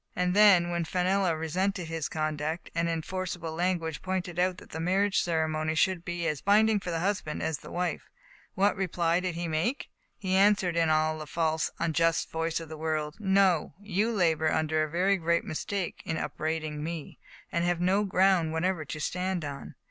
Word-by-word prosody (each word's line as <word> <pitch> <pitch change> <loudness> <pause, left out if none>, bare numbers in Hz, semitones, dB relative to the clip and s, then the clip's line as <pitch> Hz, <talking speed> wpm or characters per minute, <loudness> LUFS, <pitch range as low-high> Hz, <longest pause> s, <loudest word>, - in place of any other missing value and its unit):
And 180 +1 0
then, 190 -5 +6
when 170 0 0
Fenella 180 0 +1
resented 180 +3 -1
his 165 -1 -3
conduct, 155 +1 -3
and 170 0 0
in 165 -1 -2
forcible 180 -3 -4
language 165 -2 -1
pointed 185 -2 -3
out 180 0 +1
that - - -14
the 160 - -5
marriage 195 +4 +2
ceremony 160 -2 0
should 180 +1 +2
be 175 -1 -3
as 150 -3 -2
binding 215 +1 +4
for 180 - -6
the 165 -1 -1
husband 190 -5 -2
as 160 -2 -1
the - - -11
wife, 180 -2 -3 0.5
what 200 +1 +3
reply 175 -3 +1
did 180 -2 -3
he 170 0 -3
make? 165 - -1 0.3
He 185 -1 -2
answered, 190 -2 +4
in 165 -1 +3
the 155 0 +1
false, 160 0 0
unjust 165 0 +1
voice 165 0 -1
of 165 - -8
the 155 0 -9
world: 155 -1 -2
" - - -27 0.2
No; 185 -5 +2
you 205 +2 0
labor 160 -6 +2
under 155 0 +1
a 155 - -3
very 185 +5 +2
great 170 -1 +1
mistake 190 +3 -4
in 160 - -2
upbraiding 155 -1 -3
me, 165 -2 -6 0.3
and 170 - 0
have 175 -1 +1
no 190 +4 +2
ground 185 -4 +3
whatever 170 0 0
to 155 - -6
stand 180 +2 -2
upon. 140 -2 -7
170 Hz, 185 wpm, -28 LUFS, 160-185 Hz, 0.5 s, then